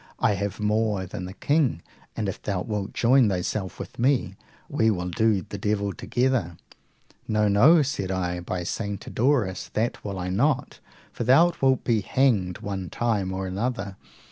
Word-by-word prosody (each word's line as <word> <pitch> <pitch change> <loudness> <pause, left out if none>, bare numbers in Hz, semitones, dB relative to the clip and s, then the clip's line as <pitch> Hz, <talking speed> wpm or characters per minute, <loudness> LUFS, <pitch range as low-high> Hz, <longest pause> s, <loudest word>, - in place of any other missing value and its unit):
I - - +2
have 100 +1 -3
more 105 -2 0
than 90 0 -6
the 90 - -7
king, 140 - +1 0.3
and 105 - -1
if 95 - -5
thou 95 -3 -2
wilt 105 -2 -3
join 125 -1 +4
thyself 95 +1 -2
with - - -9
me, 130 +2 +2 0.3
we 110 - +2
will 90 -4 -1
do 105 +1 +1
the 100 - -6
devil 100 -1 -1
together. 120 -10 -1 0.7
No, 105 -1 +2
no, 140 +11 +6
said 115 -9 -3
I; 90 -2 -2
by 90 +1 -4
St. 100 +2 -3
Adauras, 120 -7 0
that 115 +2 -1
will 100 -2 -4
I 90 0 -3
not, 130 +10 0 0.3
for - - -4
thou 140 +9 +5
wilt 130 -1 +3
be 115 -3 +1
hanged 100 -7 +1
one 95 -3 -4
time 105 -6 -1
or 95 0 -3
another. 100 +1 -3
105 Hz, 170 wpm, -25 LUFS, 95-120 Hz, 0.7 s, no